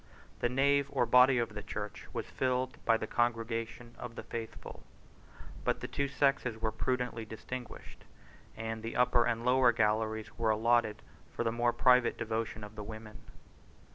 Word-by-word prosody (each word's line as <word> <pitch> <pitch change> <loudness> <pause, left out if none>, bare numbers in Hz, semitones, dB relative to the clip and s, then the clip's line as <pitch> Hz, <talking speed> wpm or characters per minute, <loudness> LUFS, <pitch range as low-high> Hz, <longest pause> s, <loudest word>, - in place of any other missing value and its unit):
The 120 - +1
nave 140 +2 +3
or 135 -3 +1
body 125 +2 +6
of 115 -3 -1
the 105 - -5
church - - -6
was - - -3
filled 130 +1 -2
by 115 - +4
the 110 - -4
congregation 115 0 -2
of 120 -1 -7
the - - -6
faithful; 115 -1 -7 0.8
but - - 0
the - - -5
two 140 - -1
sexes 135 -5 +1
were 110 -1 0
prudently 125 0 -2
distinguished, 120 +3 -8 0.5
and 110 0 -4
the 115 +1 -5
upper 125 -1 +4
and 115 0 -1
lower 125 -1 +5
galleries 110 -1 0
were 115 -1 +2
allotted 110 0 +2 0.3
for - - 0
the 115 - +1
more 120 +1 +2
private 125 -1 +4
devotion 110 -1 -3
of 105 +1 -9
the 105 - -6
women. 110 0 -9
115 Hz, 165 wpm, -32 LUFS, 110-125 Hz, 0.8 s, body